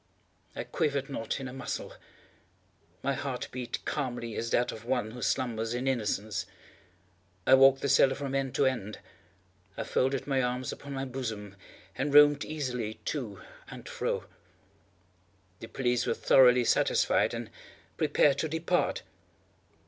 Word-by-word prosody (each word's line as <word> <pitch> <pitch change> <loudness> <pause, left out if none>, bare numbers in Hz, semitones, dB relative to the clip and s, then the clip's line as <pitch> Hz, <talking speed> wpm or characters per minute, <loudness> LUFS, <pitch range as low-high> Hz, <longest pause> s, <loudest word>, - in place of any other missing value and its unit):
I - - -3
quivered 140 -2 -1
not 115 0 -3
in 135 - -5
a 125 - -8
muscle. 135 - -5 1.1
My 140 - +1
heart 135 -2 -4
beat 125 -2 -5
calmly 120 -5 -3
as 115 - -3
that 120 - +1
of 110 - -9
one 120 -3 -1
who 125 +1 -9
slumbers 115 -2 -1
in 125 +2 -2
innocence. 110 -4 -1 1.0
I - - +5
walked 135 0 +7
the - - +1
cellar 135 0 +5
from 140 -1 -4
end 135 -1 -1
to 140 - +3
end. 115 -6 -1 0.8
I - - -2
folded 135 +1 0
my 135 -2 +1
arms 125 0 -2
upon 140 -1 -8
my 135 0 -3
bosom, 110 -6 -5 0.4
and 145 +2 -1
roamed 145 0 +7
easily 125 -8 -3 0.2
to 115 -10 -6 0.3
and - - -10
fro. - - -2 1.3
The 115 - -8
police 125 0 0
were - - +1
thoroughly 125 -2 +5
satisfied - - +2
and - - -6 0.4
prepared 140 -2 +3
to 160 - -1
depart. 160 +3 0
130 Hz, 145 wpm, -29 LUFS, 115-135 Hz, 1.3 s, walked